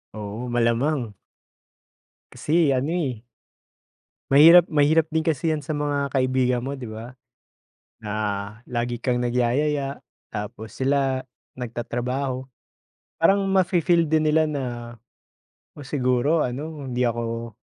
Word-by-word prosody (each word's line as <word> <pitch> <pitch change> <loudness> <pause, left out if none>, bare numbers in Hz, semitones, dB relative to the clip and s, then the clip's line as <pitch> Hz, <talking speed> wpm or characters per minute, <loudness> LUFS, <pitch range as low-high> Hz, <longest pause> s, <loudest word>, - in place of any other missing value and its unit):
Oo, 110 +3 -6
malamang. 120 +1 +1 1.2
Kasi 160 -2 +2
ano 135 +5 0
eh. 130 -10 -2 1.1
Mahirap, 165 +5 +8
mahirap 155 +1 +3
din 160 0 -1
kasi 160 0 0
yan 155 -1 -1
sa 155 - -3
mga 145 -1 -1
kaibigan 130 -2 +1
mo 140 +2 -4
'di 125 - -7
ba? 115 +4 -9 0.8
Na 105 -1 -6 0.6
lagi 120 0 -2
kang 125 -1 0
nagyayaya. 135 +4 0 0.3
Tapos, 105 +1 -6
sila 135 -1 0 0.3
nagtatrabaho, 125 +2 -3 0.7
parang 195 +4 +4
mafi-feel 175 -3 +3
din 155 0 +2
nila 155 0 +3
na, 145 -3 -3 1.1
oh, 145 - -8
siguro 135 +3 +1
ano 145 +3 -4
hindi 125 0 -1
ako 115 0 -3
135 Hz, 110 wpm, -24 LUFS, 120-150 Hz, 1.2 s, Mahirap